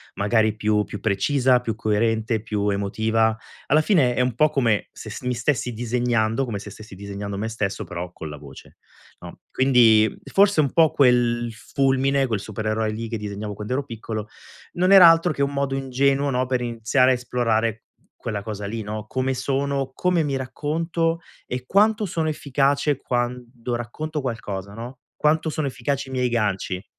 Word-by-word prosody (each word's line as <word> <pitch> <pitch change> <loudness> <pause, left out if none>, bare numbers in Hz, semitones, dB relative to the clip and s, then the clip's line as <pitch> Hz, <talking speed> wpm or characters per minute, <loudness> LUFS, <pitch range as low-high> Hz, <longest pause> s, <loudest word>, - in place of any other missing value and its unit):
magari 110 +1 +2
più 105 -1 +1
più 105 - -7
precisa, 125 +5 +2
più 115 -3 -2
coerente, 110 0 0
più 105 -2 -1
emotiva. 110 +3 +1 0.3
Alla 150 - +4
fine 155 -8 +3
è - - -2
un 125 -2 0
po' 155 +3 +4
come 115 -8 +1
se - - -10
st - - -8
mi 125 - 0
stessi 125 0 -1
disegnando, 120 0 0
come 115 -6 -4
se 105 - -9
stessi 105 -1 -12
disegnando 100 0 -6
me 110 +2 -2
stesso, 105 -3 -3
però 90 0 -6
con 80 -3 -8
la 75 - -8
voce, 70 -1 -13 0.4
no. - - -11
Quindi 115 -5 +4 0.2
forse 200 -3 +4
un 140 -3 +2
po' 160 -2 +5
quel 120 -3 +3
Fulmine, 135 +4 +1
quel 110 -5 -2
supereroe 110 +1 -2
lì 115 +1 -5
che 115 - -3
disegnavo 105 0 -5
quand'ero 125 +8 -3
piccolo, 110 -3 -6 0.5
non 185 +2 +2
era 185 -4 +10
altro 165 +1 +3
che 140 - -4
un 140 0 0
modo 140 -1 -1
ingenuo, 135 +1 +1
no, 130 -1 0
per 125 -1 0
iniziare 120 +2 +2
a - - +4
esplorare 115 -3 -1 0.4
quella 105 -3 -4
cosa 105 -1 -5
lì, 110 +3 -4
no, 105 0 -5
come 130 +2 -1
sono, 135 +1 -1
come 180 +1 +1
mi 140 -2 -1
racconto 165 +5 -1 0.3
e 125 0 -4
quanto 210 - +3
sono 165 -4 -2
efficace 140 -1 +1
quando 120 -1 -3
racconto 150 +7 -4
qualcosa, 105 -7 -5
no, 120 +4 -8 0.2
quanto 155 +1 +1
sono 155 -2 -2
efficaci 135 +1 -3
i - - -9
miei 125 -1 0
ganci? 100 -5 -1
120 Hz, 175 wpm, -23 LUFS, 110-140 Hz, 0.5 s, era